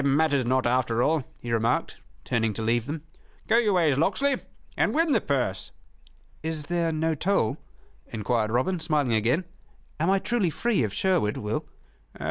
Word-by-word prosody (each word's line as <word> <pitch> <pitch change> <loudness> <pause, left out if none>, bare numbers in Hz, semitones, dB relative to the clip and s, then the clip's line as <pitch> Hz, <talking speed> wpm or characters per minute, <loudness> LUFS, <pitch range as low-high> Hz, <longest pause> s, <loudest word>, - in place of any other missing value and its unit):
"It - - -2
matters 140 -2 +2
not, 130 +1 +2
after 120 -1 +1
all," 155 -3 +1
he 120 - -6
remarked, 115 0 0 0.3
turning 115 -3 0
to 110 - -4
leave 115 +1 +1
them. 150 +1 -4 0.4
"Go 225 +2 +5
your 215 -4 +2
ways, 155 -7 +3
Locksley, 260 - +1 0.4
and - - +1
win 325 0 +2
the - - +3
purse." 125 -10 -1 0.7
"Is 160 -1 -3
there 170 +1 0
no 160 +1 0
toll?" 155 - +1 0.5
enquired 110 0 -1
Robin, 130 +11 0
smiling 150 -6 +1
again, 120 - +1 0.5
"Am 165 +4 +1
I 195 - +4
truly 205 -2 0
free 230 - 0
of 110 -4 0
Sherwood, 170 - +1
Will?" 105 +1 -3
145 Hz, 165 wpm, -26 LUFS, 115-175 Hz, 0.7 s, Go